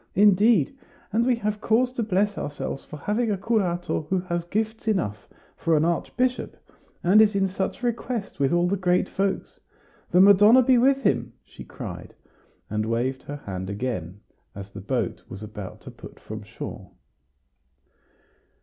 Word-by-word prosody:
Indeed, 205 - +4 0.4
and 230 +3 +2
we 250 - +4
have 210 -2 -3
cause 245 +3 +2
to 245 - -2
bless 205 -1 +1
ourselves 145 -1 -5
for 150 - -10
having 215 +9 -1
a 205 - 0
curato 180 -7 -1
who 190 - +2
has 175 -2 -3
gifts 220 +4 -3
enough 105 - -1 0.3
for 165 -1 +1
an 150 - +2
archbishop, 250 +9 -1 0.5
and 195 +5 +6
is 215 -1 +4
in 195 -1 +2
such 190 +5 -3
request 235 - -3
with 135 -1 +2
all 175 0 +3
the 195 - +1
great 180 -1 +2
folks. 195 0 -2 0.5
The 180 - +3
Madonna 205 +6 +7
be 250 0 +4
with 270 +2 +3
him!" 205 - +1
she - - -12
cried, - - -8 0.5
and 110 +1 -2
waved 125 +4 -1
her 145 - -7
hand 95 -1 -5
again, 100 -4 -4 0.3
as 100 0 -8
the 100 - -8
boat 100 - -2
was 95 +3 -8
about 105 -3 -8
to - - -10
put - - -13
from - - -8
shore. - - -8
190 Hz, 160 wpm, -25 LUFS, 140-220 Hz, 0.5 s, Madonna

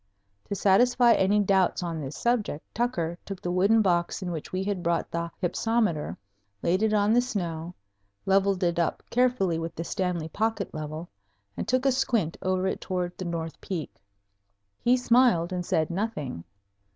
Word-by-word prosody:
To - - -3
satisfy 240 +5 +5
any 200 +2 +3
doubts 190 -2 +2
on 165 -2 -3
this 135 0 -6
subject, 230 -10 0
Tucker 175 -8 -1
took 195 -2 -7
the 175 - -3
wooden 200 +5 +4
box 175 0 +1
in 180 - -3
which 160 -3 -6
we 185 +1 -1
had 195 -2 -2
brought 170 -1 -1
the 170 0 -2
hypsometer, 205 -3 0 0.5
laid 185 +4 +2
it 220 -1 +2
on 210 0 +3
the 245 - +5
snow, 175 -8 -4 0.5
leveled 195 0 +2
it 170 -1 +1
up 170 - 0
carefully 240 -9 +2
with 165 0 -5
the 165 - -3
Stanley 175 -2 -2
pocket 220 +2 -1
level, 155 +2 -5 0.5
and - - -4
took 255 +2 +1
a 270 - +5
squint 230 -10 0
over 185 0 0
it 190 - -1
toward 180 -1 -3
the 185 - -4
north 165 -1 -4
peak. 175 -5 -5 0.8
He 245 +1 +3
smiled 235 -8 +3
and 180 -1 -2
said 160 -1 0
nothing. 170 - -3
185 Hz, 170 wpm, -27 LUFS, 170-220 Hz, 0.8 s, satisfy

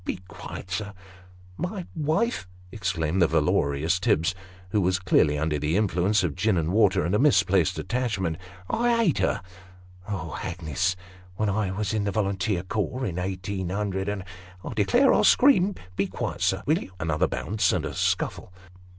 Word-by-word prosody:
Be - - -3
quiet, 95 +1 -9
sir! 100 +1 -3 0.2
" 90 -1 -22
" 90 0 -23
My 180 +1 -4
wife! 160 - 0
" 90 0 -23
exclaimed 90 -4 -1
the 85 - +6
valorous 75 +6 +1
Tibbs, 85 0 +2 0.4
who 105 - +2
was 95 0 +2
clearly 85 -5 +3
under 75 0 0
the 75 +5 0
influence 100 0 +2
of 85 -5 0
gin 100 +3 +1
and 80 0 0
water, 100 -4 +3
and 85 - -1
a 105 - +3
misplaced 100 - +3
attachment; 100 -10 -1 0.2
" 90 - -21
I 235 0 +2
ate 170 - +2
her! - - 0 0.7
Oh, 85 -8 -4
Hagnes! 90 +2 -1 0.4
when 105 +2 0
I 100 -1 0
was 100 +2 -2
in 105 -2 0
the 100 - 0
volunteer 100 -2 -1
corps, 110 +7 -2
in 90 -3 -3
eighteen 95 0 -3
hundred 95 0 -2
and 100 -2 -3 0.2
" 90 0 -18
" 90 0 -18
I - - -4
declare 255 +2 +4
I'll - - +3
scream. 205 -8 +5 0.2
Be 100 +1 0
quiet, - - -4
sir, - - +1
will - - +2
you? 95 - -10
" - - -23
(Another 80 -2 +1
bounce 105 -3 0
and - - -1
a - - -4
scuffle.) - - -1
95 Hz, 190 wpm, -26 LUFS, 90-105 Hz, 0.7 s, the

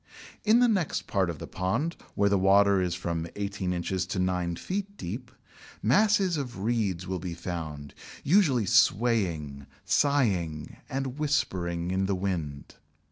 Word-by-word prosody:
In 225 +3 +5
the 245 - +6
next 190 -9 0
part 95 -3 0
of 85 - -4
the - - -7
pond, 115 - -1 0.2
where 100 - +3
the 100 - +3
water 100 0 +5
is 90 -1 -1
from 85 -2 -3
eighteen 100 -2 -3
inches 90 +1 -2
to 95 - -3
nine 90 -2 0
feet 200 - -4
deep, 120 +8 -6 0.5
masses 190 - +3
of 125 -9 -5
reeds 105 -6 0
will 95 0 -3
be 85 -1 -5
found 80 -5 -6 0.3
usually 145 - +3
swaying, 95 - +2 0.2
sighing, 95 - +1
and 135 +1 -3
whispering 90 - -1
in 95 +1 0
the 100 - +1
wind. 85 -7 -4
95 Hz, 145 wpm, -28 LUFS, 85-130 Hz, 0.5 s, the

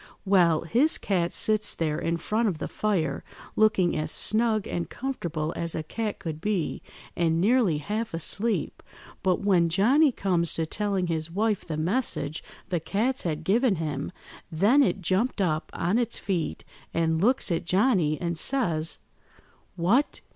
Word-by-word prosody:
Well, 175 -5 +4
his 245 - +2
cat 175 -4 0
sits 215 -1 +2
there 155 -2 -1
in 170 0 -1
front 220 +7 0
of 180 -6 -1
the 155 - -4
fire 170 -10 -1 0.3
looking 215 -5 +3
as 155 0 -2
snug 220 -1 +1
and 170 - -3
comfortable 170 - -3
as 170 -1 -2
a 160 - -3
cat 215 +6 -4
could 160 -3 -6
be, 195 -5 -1 0.3
and 165 -1 +1
nearly 210 -4 +3
half–asleep, 210 +3 -3 0.4
but 185 -2 +1
when 180 -4 +3
Johnny 255 - +4
comes 180 -7 0
to 165 - 0
telling 200 +1 -1
his 160 -2 -2
wife 210 +3 0
the 155 -3 -3
message 170 - -1 0.3
the 175 -2 0
cats 225 +10 0
had 160 -2 -3
given 220 +5 +2
him, 150 -3 -3 0.4
then 205 - +4
it 215 -7 +1
jumped 200 +8 0
up 160 -5 0
on 185 +7 0
its 235 -1 -1
feet, 170 - -3 0.3
and 160 -1 +1
looks 245 -1 +2
at 165 - -1
Johnny, 185 - +2
and 170 -2 -1
says— 170 - +1 0.8
"'What! 200 +12 +1
185 Hz, 155 wpm, -26 LUFS, 165-215 Hz, 0.8 s, Well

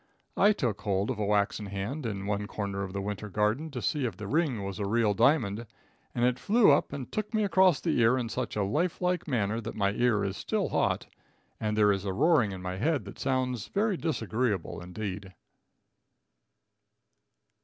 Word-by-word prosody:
I 205 - +5
took 120 - -1
hold 100 +3 0
of 115 - -4
a 105 - 0
waxen 105 0 +1
hand 105 +8 -4
in 100 -3 -4
one 105 0 -2
corner 100 -2 -4
of 95 -1 -4
the 100 0 -3
winter 105 +1 -4
garden 105 - 0
to 125 -5 -6
see 145 -5 0
if 115 - -7
the 105 - -6
ring 135 -3 0
was 100 +1 -5
a 100 - -1
real 110 0 +2
diamond, 115 -2 +2 0.5
and 120 - +2
it 125 0 +1
flew 210 - +5
up 140 - +2
and 135 -3 -6
took 215 +1 -3
me 215 - +2
across 185 -5 +4
the 165 -7 0
ear 115 +3 +4
in 120 -2 -2
such 110 - -3
a 105 - +1
life 155 - 0
like 180 -1 0
manner 115 -4 0
that 110 - -6
my 100 -1 +1
ear 110 -1 +2
is 95 -1 -2
still - - -1
hot - - 0 0.5
and 105 -1 -1
there 105 -1 +5
is 100 -1 -1
a 95 -2 -2
roaring 145 - +3
in 95 -1 -7
my 90 0 -4
head 145 +7 0
that - - -10
sounds 125 -4 -1
very 210 0 0
disagreeable, 115 - -2
indeed. 95 +1 -6
110 Hz, 195 wpm, -29 LUFS, 100-140 Hz, 0.5 s, I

